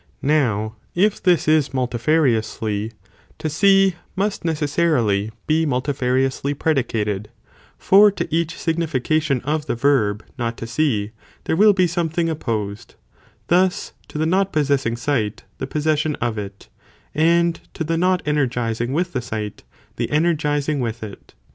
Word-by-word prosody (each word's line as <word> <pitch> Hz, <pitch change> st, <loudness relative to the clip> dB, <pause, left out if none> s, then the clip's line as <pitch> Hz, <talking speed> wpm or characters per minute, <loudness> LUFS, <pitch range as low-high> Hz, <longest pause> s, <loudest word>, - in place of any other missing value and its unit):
Now 115 Hz, -7 st, +1 dB, 0.2 s
if 200 Hz, +4 st, +2 dB
this 180 Hz, -3 st, +2 dB
is 150 Hz, -4 st, +2 dB
multifariously, 120 Hz, -5 st, 0 dB, 0.5 s
to 155 Hz, -, -3 dB
see, 195 Hz, +2 st, +4 dB, 0.2 s
must 200 Hz, +1 st, -1 dB
necessarily 145 Hz, -10 st, +1 dB, 0.2 s
be 160 Hz, +1 st, +2 dB
muiti 135 Hz, +1 st, -1 dB
fariously 130 Hz, +2 st, 0 dB
predicated; 110 Hz, -9 st, -1 dB, 0.5 s
for 205 Hz, +2 st, +6 dB
to 200 Hz, -, -3 dB
each 165 Hz, -1 st, -1 dB
(signification 155 Hz, -4 st, 0 dB
of 150 Hz, +3 st, -2 dB
the -, -, -1 dB
verb) 115 Hz, -5 st, +1 dB, 0.2 s
not 115 Hz, -1 st, -2 dB
to -, -, -6 dB
see, 115 Hz, -5 st, 0 dB, 0.3 s
there -, -, 0 dB
will 210 Hz, +4 st, +6 dB
be 185 Hz, -2 st, +3 dB
something 170 Hz, -1 st, -1 dB
opposed, 110 Hz, -9 st, -4 dB, 0.5 s
thus 180 Hz, +1 st, +1 dB
to -, -, -8 dB
the 155 Hz, -, +1 dB
not 190 Hz, +4 st, +1 dB
possessing 140 Hz, -6 st, +1 dB
sight, 115 Hz, -5 st, -1 dB, 0.2 s
the -, -, -3 dB
possession 150 Hz, +1 st, 0 dB
of 120 Hz, -2 st, -2 dB
it, 100 Hz, -1 st, -8 dB, 0.5 s
and 170 Hz, +2 st, +2 dB, 0.2 s
to -, -, -2 dB
the 165 Hz, +1 st, -1 dB
not 180 Hz, +2 st, +1 dB
ener 150 Hz, -3 st, +1 dB
gizing 120 Hz, +1 st, -2 dB
with 175 Hz, +3 st, -1 dB
the 125 Hz, -, -1 dB
sight, 110 Hz, -3 st, -5 dB, 0.4 s
the -, -, -2 dB
energizing 150 Hz, -2 st, +1 dB
with 115 Hz, -2 st, -3 dB
it. 105 Hz, -2 st, -11 dB
145 Hz, 140 wpm, -21 LUFS, 115-165 Hz, 0.5 s, for